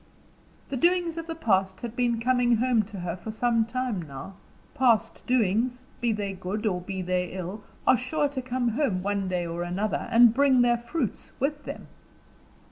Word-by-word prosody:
The 275 - -2
doings 345 +3 +2
of 330 0 -5
the 330 - -4
past 190 -9 +1
had 235 -1 -5
been 240 -2 +1
coming 245 0 +3
home 240 0 +3
to 200 -3 -8
her 175 -1 -3
for 185 +4 -9
some 230 +1 +1
time 250 -4 -2
now 140 +4 -8 0.4
past 230 -3 +2
doings, 245 +1 +1 0.2
be 235 -1 +1
they 205 -2 -2
good 190 +4 -4
or 180 -4 0
be 190 +1 -4
they 180 0 0
ill, 190 +3 -5 0.2
are 255 - +6
sure 290 +4 0
to 275 -2 -4
come 250 -1 -1
home, 220 -7 0
one 200 -1 -1
day 180 -1 -1
or 170 +1 -4
another, 185 +5 -2
and 235 -1 +7
bring 260 -1 +4
their 240 -1 +3
fruits 240 - -3
with 290 +2 -1
them. - - -7
230 Hz, 185 wpm, -27 LUFS, 190-255 Hz, 0.4 s, and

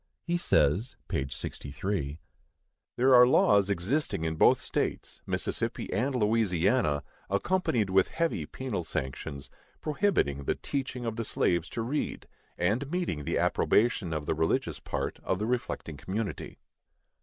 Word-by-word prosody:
He 170 +1 -1
says 110 - +2
(p. 70 - -1
63): 75 +3 -4 0.8
There 130 +2 +5
are 125 0 +9
laws 100 -5 +4
existing 100 - 0
in 80 0 -1
both - - +5
states, - - -3
Mississippi - - -2
and 130 +8 0
Louisiana, 105 - +2 0.3
accompanied 110 - +1
with 95 0 +4
heavy 165 - -1
penal 125 -9 -4
sanctions, 70 -1 -4 0.3
prohibiting 150 - 0
the - - +1
teaching 130 -3 -4
of 115 -1 -3
the 115 - -1
slaves 85 -5 +1
to 115 - -3
read, 140 +6 -3 0.3
and 110 +10 0
meeting 165 - -2
the - - 0
approbation 105 -6 +2
of 75 -2 -2
the - - +1
religious 80 +1 0
part - - -3
of 95 - -1
the 105 - -2
reflecting 120 - -3
community. 100 +7 -4
100 Hz, 135 wpm, -29 LUFS, 80-125 Hz, 0.8 s, are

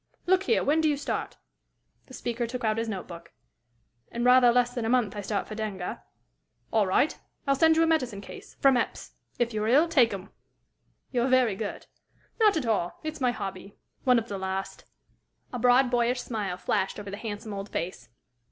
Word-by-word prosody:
Look 375 +1 +4
here; 460 - +2
when 310 +3 +2
do 310 - +3
you 290 - +1
start?" 285 - -4 0.7
The 260 - -11
speaker 240 0 -3
took 250 +1 -5
out 220 0 +1
his 230 0 -2
note 195 -4 -5
book. 170 -1 -11 0.8
"In 235 - -3
rather 250 0 +6
less 245 0 +2
than 245 -2 -3
a 225 - -1
month 240 -5 +2
I 205 - -3
start 200 0 -2
for - - -7
Denga." 210 -4 -4 0.7
"All 215 -3 +3
right. 235 +11 +2 0.3
I'll 275 - +3
send 320 +3 +4
you 325 - +5
a - - +4
medicine 255 -11 0
case 200 - -11
from 270 -2 +5
Epps. 235 - -3 0.3
If 240 -1 0
you're 215 0 -1
ill, 285 +8 +5
take 265 -9 +4
'em." 195 +1 -7 0.8
"You're 245 -1 +1
very 255 -5 +3
good." 205 +1 -5 0.5
"Not 420 -5 +5
at 290 - -2
all. 210 -6 -1
It's 310 -1 -5
my 250 - +3
hobby 195 -4 -6 0.3
one 250 -2 +5
of 230 0 -1
the 200 -3 -5
last." 190 0 -4 0.7
A 245 - -3
broad, 250 +1 +4
boyish 245 +1 +1
smile 205 -7 -3
flashed 190 +2 -1
over 205 -1 -7
the 200 - -5
handsome 215 0 -6
old 200 0 -6
face. 165 -8 -5
235 Hz, 200 wpm, -27 LUFS, 205-255 Hz, 0.8 s, rather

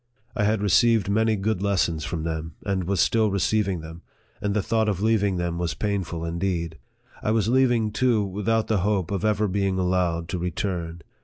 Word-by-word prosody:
I 105 -4 +1
had 105 -1 +1
received 105 +1 +3
many 110 +1 +2
good 100 -1 -1
lessons 90 -6 0
from 80 -2 -3
them, 80 -1 -4
and 95 -3 -1
was 95 0 -1
still 110 +5 +3
receiving 100 -1 0
them, 80 +2 -10 0.4
and 105 0 -1
the 105 - +1
thought 110 -1 +1
of 95 -4 -1
leaving 105 -2 +2
them 85 -1 -2
was 85 -1 -2
painful 95 -5 -2
indeed. 85 -1 -2 0.4
I - - -1
was 110 -1 +2
leaving, 120 -4 +3
too, 115 -3 +2
without 105 +3 0
the 110 -3 +1
hope 95 -2 0
of 100 0 -2
ever 105 0 +2
being 95 0 0
allowed 90 -2 0
to 90 - -2
return. 85 -1 -3
100 Hz, 185 wpm, -24 LUFS, 85-110 Hz, 0.4 s, received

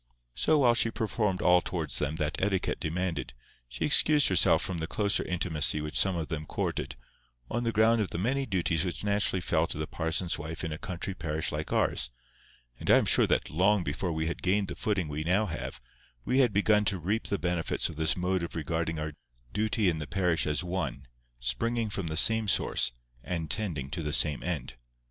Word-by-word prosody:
So, 155 - +2
while 125 -5 +5
she 115 - +2
performed 105 -4 -1
all 90 0 +5
towards 80 -9 -3
them 75 +1 -1
that 75 0 -2
etiquette 95 -1 0
demanded, 85 -5 -3 0.3
she - - -2
excused 150 0 +5
herself 95 - +4
from 90 -3 -3
the 80 - -3
closer 100 +1 +1
intimacy 80 -4 0
which 75 0 -5
some 95 -2 +3
of 80 -3 -3
them 80 -2 -5
courted, - - -3 0.6
on 120 +1 -1
the 115 - +1
ground 115 +1 +3
of 100 - -1
the - - -5
many 130 +8 0
duties 85 -4 0
which 90 +1 -4
naturally 100 -2 +1
fell 85 -1 +1
to - - -5
the 75 - -2
parson's 80 +2 -2
wife 80 +2 -6
in 80 - -3
a 75 - -5
country 95 -1 -4
parish 80 -3 -2
like 75 +1 -4
ours; - - +1 0.7
and - - -5
I - - +8
am - - +2
sure - - +4
that - - 0
long 95 +4 +3
before 85 +4 -2
we 80 0 -2
had 85 - -3
gained 95 +2 +1
the - - -5
footing 100 -6 -1
we 75 +1 -4
now 95 +6 +2
have, 80 -6 -5 0.5
we 130 - +2
had 125 -4 +4
begun 105 +1 +3
to 100 -3 +1
reap 100 +7 -2
the 100 - -1
benefits 90 -3 -1
of - - -7
this 80 +3 +2
mode 90 +1 0
of 85 - -5
regarding 80 0 -2
our 75 0 -4 0.4
duty 110 -1 +1
in 80 -3 +1
the 75 - -5
parish 90 -5 +1
as 75 +4 -1
one, 85 -7 -3 0.3
springing 110 - -1
from 95 -4 -3
the 80 0 -3
same 110 +4 +3
source, 90 - +2 0.3
and 80 -4 -3
tending 80 -11 -1
to 85 - -3
the 75 -2 -3
same 75 -2 +2
end. 80 -7 -4
90 Hz, 210 wpm, -29 LUFS, 80-100 Hz, 0.7 s, I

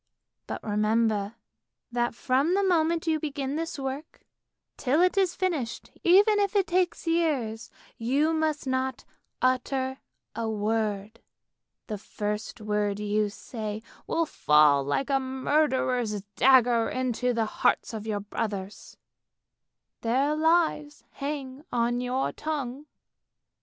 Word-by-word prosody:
But - - -5
remember 215 0 +1 0.6
that 240 -1 0
from 270 +9 +1
the 400 - +2
moment 335 -3 +2
you 320 -1 +1
begin 280 -2 -3
this 330 0 -3
work, 275 +3 -6 0.5
till 275 +4 +1
it 365 +2 +4
is 380 -3 +2
finished, 315 -11 -2
even 410 +4 +6
if 405 0 0
it 395 -2 +4
takes 360 0 0
years, 295 -10 0 0.3
you 280 +8 +2
must 315 -2 0
not 260 -1 -2 0.4
utter 260 +1 0 0.4
a 225 -1 -2
word! 215 0 -1 0.7
The 210 -3 -5
first 210 +2 -4
word 210 -1 -1
you 210 0 0
say 215 0 -6 0.2
will 330 0 +1
fall 150 - +4
like 200 - -1
a 270 - +3
murderer's 260 -5 0
dagger 245 -3 +5
into 250 -1 0
the 230 -2 0
hearts 215 - 0
of 220 0 -5
your 205 -2 -1
brothers. 205 -1 -5 1.0
Their 270 +6 +1
lives 315 -2 +1
hang 280 -1 -5
on 240 +1 +1
your 250 +2 -1
tongue. 290 -2 -4
255 Hz, 120 wpm, -27 LUFS, 220-305 Hz, 1.0 s, even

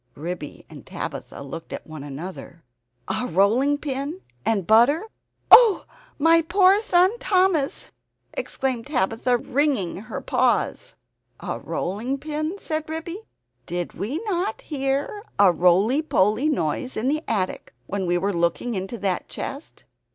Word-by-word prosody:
Ribby 165 -1 -6
and - - -12
Tabitha - - -6
looked 165 +4 -8
at - - -6
one 155 -3 -9
another. 165 +3 -8 0.4
"A 250 - -1
rolling 225 - +3
pin 285 +5 -4 0.2
and 205 -5 0
butter! 240 - +5 0.5
Oh, 455 -5 +8 0.3
my 330 +2 +5
poor 375 +4 +4
son 380 +1 +3
Thomas!" 365 - +1 0.4
exclaimed 260 -2 -3
Tabitha, 245 -1 +1
wringing 260 - 0
her 205 - -6
paws. - - 0 0.4
"A - - -4
rolling 225 +9 -3
pin?" 310 +5 -3
said 315 -5 -4
Ribby. 330 +5 -5 0.5
"Did 175 0 -3
we 235 +10 -3
not 395 +4 -1
hear 280 - -2 0.2
a 195 -2 +6
roly 185 - +3
poly 220 -1 +2
noise 255 - -1
in 225 +4 -1
the 305 +3 0
attic 190 -4 -2
when 195 -2 -3
we 175 0 +2
were 195 +3 0
looking 170 +8 0
into 195 +4 -4
that 195 -4 -2
chest?" 280 +3 -7
260 Hz, 135 wpm, -24 LUFS, 190-315 Hz, 0.5 s, Oh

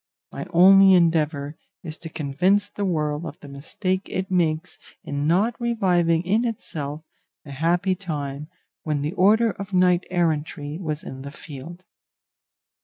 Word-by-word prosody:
My - - -6
only 190 +2 +7
endeavour 155 -4 +1 0.3
is 160 -3 -5
to 165 - -8
convince 165 +8 +1
the 205 - -4
world 150 -3 -1
of 160 -3 -8
the - - -12
mistake 185 +7 -3
it 190 0 -3
makes 165 -2 0 0.2
in 145 +1 -2
not 195 +8 +2
reviving 180 -8 +2
in 210 +6 +1
itself 155 -10 -4 0.4
the 140 - -11
happy 170 +6 +1
time 150 -6 -5 0.3
when 150 -2 -2
the 150 +3 -2
order 220 +5 +4
of 200 0 -9
knight 180 -1 +3
errantry 160 -3 -1
was 155 -5 -4
in 130 - -8
the 140 - -7
field. 160 +5 -10
170 Hz, 145 wpm, -23 LUFS, 150-185 Hz, 0.4 s, only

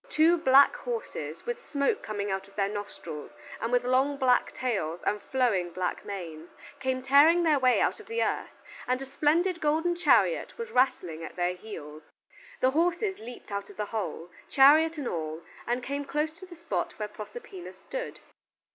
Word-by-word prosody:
Two 325 -3 +4
black 280 - +6
horses, 485 -1 -5
with 480 0 -4
smoke 285 +9 +1
coming 205 -2 -3
out 195 0 -3
of 200 - -20
their 195 -1 +1
nostrils 205 -7 -7 0.3
and 230 - -2
with 245 0 +3
long 265 +3 +2
black 255 -2 +3
tails 190 -10 -2
and 210 0 0
flowing 230 -9 +1
black 180 +1 -3
manes, 170 -5 -7 0.3
came 260 -1 -1
tearing 295 +6 +6
their 305 -4 +3
way 255 -1 +4
out - - +1
of 430 - -13
the 460 +1 0
earth, - - -3 0.2
and 255 +1 +1
a 270 - -6
splendid 330 +6 +1
golden 320 +3 +1
chariot 355 +7 +2
was 465 0 -6
rattling 180 -11 +1
at - - -8
their 180 0 0
heels. 155 -6 -9 0.6
The 260 - +4
horses 350 +6 0
leaped 235 -1 -10
out 200 0 -4
of - - -14
the 210 - -1
hole, 180 -5 -4 0.2
chariot 310 +4 +6
and 285 -4 -3
all, 160 -1 -4 0.2
and 240 +1 -1
came 280 +2 -3
close 300 +2 -1
to 375 - -10
the 350 - -11
spot 335 0 -3
where 210 - -3
Proserpina 370 - -9
stood. - - -7
260 Hz, 180 wpm, -28 LUFS, 205-325 Hz, 0.6 s, black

